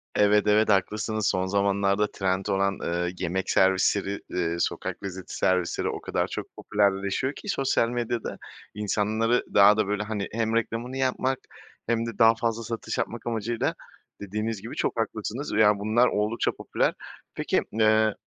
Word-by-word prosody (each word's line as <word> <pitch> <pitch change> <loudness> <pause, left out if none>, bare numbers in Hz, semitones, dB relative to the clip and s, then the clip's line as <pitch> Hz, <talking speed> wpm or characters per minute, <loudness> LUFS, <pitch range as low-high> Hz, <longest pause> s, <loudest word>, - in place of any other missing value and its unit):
Evet, 105 0 +4
evet, 105 +1 +4
haklısınız. 105 +2 +1
Son 95 0 +1
zamanlarda 100 +1 +1
trend 95 0 -1
olan, 100 0 0
ııı, 85 +1 -1
yemek 95 +2 -2
servisleri, 95 +1 +2
ııı, 85 -1 -1
sokak - - -2
lezzeti 95 -2 -6
servisleri 90 -2 +1
o - - -5
kadar - - -1
çok - - -5
popülerleşiyor 100 +6 0
ki 205 - -8
sosyal 135 -6 +1
medyada, 120 -1 -3 0.4
insanları 110 +3 0
daha 100 +1 +7
da, 110 - +1
böyle, 105 0 -1
hani, 105 -1 -3
hem 115 0 -1
reklamını 115 +3 -2
yapmak 130 0 0 0.5
hem 115 0 +1
de 115 -3 -6
daha 115 0 +6
fazla 115 0 -2
satış 115 0 -4
yapmak 120 0 -3
amacıyla, 115 0 -1 0.5
dediğiniz 105 +1 -3
gibi, 115 - -7
çok 115 - -1
haklısınız 115 +5 -3
ve, 110 - +3
ya, 105 -1 +5
bunlar 110 +4 +3
oldukça 105 +2 0
popüler. - - -1 0.4
Peki, - - +1
eee 110 0 +3
105 Hz, 155 wpm, -26 LUFS, 100-115 Hz, 0.5 s, daha